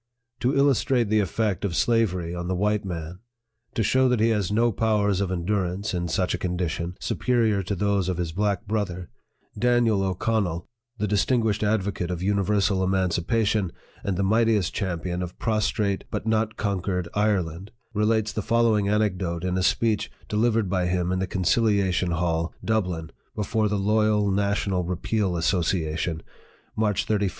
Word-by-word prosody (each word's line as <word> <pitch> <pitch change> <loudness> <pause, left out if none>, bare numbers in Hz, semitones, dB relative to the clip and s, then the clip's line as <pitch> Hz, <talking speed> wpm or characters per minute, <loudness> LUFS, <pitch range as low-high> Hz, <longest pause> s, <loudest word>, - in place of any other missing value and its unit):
To 130 +3 +1
illustrate 130 -4 +2
the 110 0 +3
effect 100 0 -1
of 95 -4 -1
slavery 95 -8 +1
on 85 0 -4
the 95 - -1
white 105 +2 +1
man, 85 -1 -6 0.6
to 115 - +1
show 130 +5 +3
that 125 -2 +2
he 115 +1 +3
has 105 -4 0
no 115 +3 +3
powers 105 -2 +1
of 100 - -1
endurance, 95 +2 -1
in 85 -1 -1
such 90 +2 0
a - - -2
condition, 90 -1 -2
superior 115 -5 +1
to 95 +2 -3
those 100 -1 +1
of 90 - -1
his 85 -2 -2
black 100 +1 -1
brother, 95 -4 -3 0.5
DANIEL 120 -4 +3
O'CONNELL, 95 -2 -1 0.3
the 105 - -1
distinguished 105 +1 +1
advocate 100 -4 0
of 90 0 -3
universal 100 -1 +1
emancipation, 95 +2 +1 0.3
and 95 -3 -1
the 100 - +1
mightiest 110 -1 +2
champion 90 -2 -2
of 90 0 -6
prostrate 105 -3 0
but - - -4
not 110 0 0
conquered 95 -3 -1
Ireland, 100 -3 0 0.2
relates 110 0 +1
the 110 - -2
following 110 -2 +2
anecdote 95 -5 0
in 90 0 -1
a 95 - 0
speech 110 +3 +1 0.2
de - - -4
livered 115 -1 +2
by 90 -1 0
him 90 0 0
in 95 - 0
the 95 - -1
Conciliation 95 -1 +1
Hall, 85 0 -1
Dublin, 90 -7 -1 0.2
before 110 +1 0
the 105 - 0
Loyal 105 0 +2
National 100 -2 0
Repeal 90 +1 -1
Association, 80 -2 0 0.5
March 105 -3 +1
31, - - 0
1845. 100 -1 +1
100 Hz, 160 wpm, -25 LUFS, 90-110 Hz, 0.6 s, the